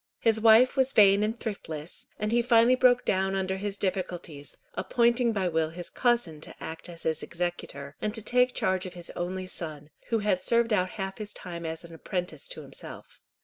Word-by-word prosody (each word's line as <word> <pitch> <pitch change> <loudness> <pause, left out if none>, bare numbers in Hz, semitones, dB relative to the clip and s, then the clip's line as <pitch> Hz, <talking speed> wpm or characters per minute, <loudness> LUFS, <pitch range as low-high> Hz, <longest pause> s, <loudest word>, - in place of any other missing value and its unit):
His 220 -1 +2
wife 230 +4 +6
was 265 -1 +2
vain 200 -1 +6
and 220 +3 -1
thriftless, 165 -7 -6
and 210 +1 -2
he 240 +1 +4
finally 235 0 +5
broke 250 -1 +4
down 190 0 +1
under 190 0 -1
his 200 0 -3
difficulties, 175 -7 -4 0.2
appointing 235 0 +2
by 195 -4 0
will 160 -2 +1
his 175 +1 -8
cousin 235 -11 +1
to - - -11
act 160 +2 -7
as 170 -1 -8
his 160 -1 -1
executor, 170 -5 -5
and 210 - 0
to 225 - -3
take 250 +2 +2
charge 185 0 0
of 180 - -10
his 175 -1 -8
only 185 +2 -4
son, 155 -4 -3 0.2
who 230 - +1
had 205 -4 +1
served 235 -1 +2
out 185 -3 +2
half 195 0 -4
his 210 0 -5
time 170 -3 -6
as 160 +1 -5
apprentice 180 - -5
to - - -6
himself. - - -8
190 Hz, 190 wpm, -28 LUFS, 170-230 Hz, 0.2 s, wife